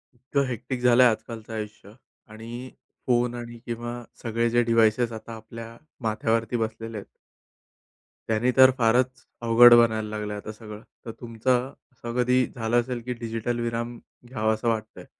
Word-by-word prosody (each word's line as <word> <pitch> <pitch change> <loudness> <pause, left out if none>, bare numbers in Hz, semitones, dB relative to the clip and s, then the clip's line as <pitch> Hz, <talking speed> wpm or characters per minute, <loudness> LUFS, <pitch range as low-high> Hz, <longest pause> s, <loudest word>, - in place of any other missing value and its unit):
इतकं 135 +3 -1
हेक्टिक 125 +1 -4
झालं 125 0 +6
आहे 125 - +7
आजकालचं 110 0 -7
आयुष्य 105 -2 -7 0.4
आणि 115 +4 -8 0.4
फोन 120 -1 +2
आणि 120 0 -7
किंवा 120 0 -5 0.2
सगळे 115 0 0
जे 120 +1 +3
डिव्हाइसेस 115 0 +3
आता 115 +1 -8
आपल्या 115 +1 -10 0.2
माथ्यावरती 115 +1 0
बसलेले 110 0 -4
आहेत. 100 - -11 1.1
त्यांनी 115 +3 +2
तर 130 0 +9
फारच 120 +1 +1 0.2
अवघड 120 +1 +8
बनायला 110 -2 +3
लागलं 105 -1 -4
आहे 105 - -5
आता 110 - -7
सगळं. 105 -1 -10 0.2
तर 115 - -5
तुमचा 120 +1 0 0.4
असं 120 -1 -7
कधी 125 +1 +3
झालं 115 +1 +1
असेल 120 0 -5
की 125 - -2
डिजिटल 115 0 -3
विराम 120 0 -3 0.3
घ्यावासा 110 -2 -1
वाटतं 110 -1 -2
आहे. - - -11
115 Hz, 155 wpm, -25 LUFS, 110-120 Hz, 1.1 s, तर